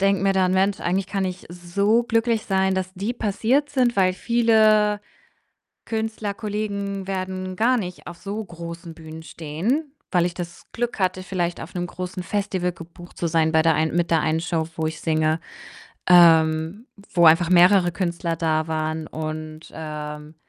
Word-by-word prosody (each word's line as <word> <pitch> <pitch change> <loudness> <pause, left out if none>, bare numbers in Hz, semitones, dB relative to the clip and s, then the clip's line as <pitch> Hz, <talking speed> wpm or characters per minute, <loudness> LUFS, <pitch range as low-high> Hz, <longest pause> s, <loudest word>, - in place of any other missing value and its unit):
denke 195 0 +2
mir 195 0 +3
dann: 185 -1 +2
„Mensch, 195 +1 +1
eigentlich 185 +2 0
kann 195 -1 -2
ich 185 0 -5
so 200 +7 +1
glücklich 230 -1 0
sein, 190 -1 +1
dass 185 0 -3
die 200 +5 -2
passiert 240 +6 0
sind,“ 250 -5 +1
weil 185 -2 +4
viele 215 -1 +3 0.9
Künstlerkollegen 205 -3 -3
werden 185 -1 -4
gar 240 +5 +3
nicht 180 -5 -6
auf 175 0 -8
so 210 +2 -5
großen 170 -2 -8
Bühnen 160 0 -10
stehen, 195 - -3 0.2
weil 175 -2 +3
ich 175 - -2
das 170 -1 -8
Glück 240 -2 -3
hatte, 185 0 0
vielleicht 175 -2 -2
auf 175 - -10
'nem 175 0 -1
großen 180 0 -6
Festival 185 -2 -1
gebucht 175 +1 -13
zu 170 - -1
sein 160 -1 +2
bei 160 - +4
der 165 0 +3
ein 160 +1 0
mit 175 -1 +1
der 165 -2 +3
einen 160 +1 +1
Show, 165 -1 -1
wo 160 -1 -1
ich 160 0 -6
singe, 155 0 +1 0.7
ähm, 165 +3 +5 0.3
wo 170 -2 +5
einfach 165 +2 +6
mehrere 180 0 +5
Künstler 170 -2 -2
da 160 -1 0
waren 155 0 -2
und, 155 0 -6
ähm, 150 0 -7
180 Hz, 165 wpm, -23 LUFS, 165-200 Hz, 0.9 s, einfach